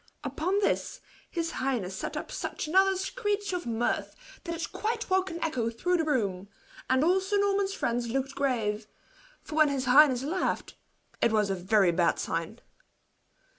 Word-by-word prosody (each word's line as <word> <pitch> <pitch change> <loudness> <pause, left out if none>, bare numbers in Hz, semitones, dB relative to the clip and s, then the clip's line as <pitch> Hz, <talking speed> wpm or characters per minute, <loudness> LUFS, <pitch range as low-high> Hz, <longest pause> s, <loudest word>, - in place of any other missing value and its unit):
Upon 315 +8 -1
this, - - 0 0.3
his 335 -1 -2
highness 230 -8 -2
net - - -4
up - - -6
such - - -4
another 385 +4 +4
screech 410 0 -2
of 350 -5 -3
mirth 230 +1 -1 0.3
that 335 -1 -3
it - - -4
quite 440 +2 -2
woke 380 0 +2
an 335 - -5
echo 250 -8 0
through 355 +11 0
the 325 - +1
room; 200 -10 -1 0.4
and 260 +2 +3
all 360 +4 +4
Sir 390 +2 0
Norman's 400 -1 +1
friends 235 -5 -1
looked 270 +2 -2
grave; 220 -7 -1 0.6
for - - -9
when 310 -1 +5
his 275 -2 -1
highness 260 -1 +6
laughed, 345 +7 -2 0.5
it 235 - +4
was 210 -2 +2
a - - 0
very 190 0 +3
bad 170 0 +2
sign. - - -3
280 Hz, 170 wpm, -28 LUFS, 230-370 Hz, 0.6 s, highness